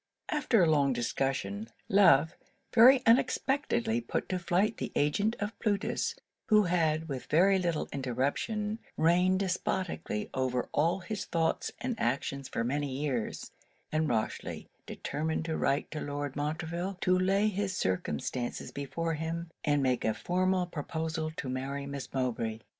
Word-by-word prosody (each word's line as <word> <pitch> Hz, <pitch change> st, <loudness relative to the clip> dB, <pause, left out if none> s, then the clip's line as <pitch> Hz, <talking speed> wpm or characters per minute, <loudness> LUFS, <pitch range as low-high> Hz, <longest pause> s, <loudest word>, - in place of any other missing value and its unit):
After 265 Hz, -, +3 dB
a -, -, +4 dB
long 145 Hz, -4 st, +3 dB
discussion, 115 Hz, -4 st, -2 dB, 0.2 s
Love 180 Hz, -5 st, +5 dB, 0.4 s
very 255 Hz, +3 st, +8 dB
unexpectedly 235 Hz, -1 st, +2 dB
put -, -, -3 dB
to 185 Hz, -, -1 dB
flight 185 Hz, +5 st, +1 dB
the -, -, -4 dB
agent 200 Hz, +10 st, +2 dB
of 205 Hz, +1 st, -4 dB
Plutus, 210 Hz, -, 0 dB, 0.3 s
who 215 Hz, -1 st, +6 dB
had, 160 Hz, -3 st, +1 dB
with 135 Hz, -4 st, -5 dB
very 190 Hz, +5 st, +4 dB
little 170 Hz, -4 st, -1 dB
interruption, 140 Hz, -, -1 dB, 0.2 s
reigned 180 Hz, +4 st, +3 dB
despoticly 180 Hz, -, -2 dB
over 130 Hz, -1 st, 0 dB
all 165 Hz, +5 st, +1 dB
his 210 Hz, +1 st, -4 dB
thoughts 165 Hz, -1 st, 0 dB
and 250 Hz, -3 st, -3 dB
actions 135 Hz, +2 st, -1 dB
for 115 Hz, -, -1 dB
many 140 Hz, +3 st, -1 dB
years; 135 Hz, -6 st, -3 dB, 0.4 s
and 155 Hz, 0 st, +1 dB
Rochely 110 Hz, -2 st, -2 dB, 0.2 s
determined 160 Hz, +2 st, -3 dB
to 160 Hz, -1 st, -2 dB
write 140 Hz, +1 st, 0 dB
to 155 Hz, -, -4 dB
Lord 145 Hz, -1 st, -4 dB
Montreville, 160 Hz, +5 st, -3 dB
to 185 Hz, -, +3 dB
lay 195 Hz, +3 st, +3 dB
his 200 Hz, -2 st, -1 dB
circumstances 95 Hz, -, -2 dB
before 165 Hz, +4 st, -3 dB
him, 165 Hz, +2 st, -4 dB
and 145 Hz, -2 st, +2 dB
make 130 Hz, -2 st, +1 dB
a 110 Hz, -, +1 dB
formal 185 Hz, +1 st, +1 dB
proposal 160 Hz, -1 st, -3 dB
to 145 Hz, -, -5 dB
marry 135 Hz, +2 st, -3 dB
Miss 140 Hz, -1 st, -6 dB
Mowbray. 115 Hz, -4 st, -1 dB
160 Hz, 140 wpm, -30 LUFS, 140-190 Hz, 0.4 s, very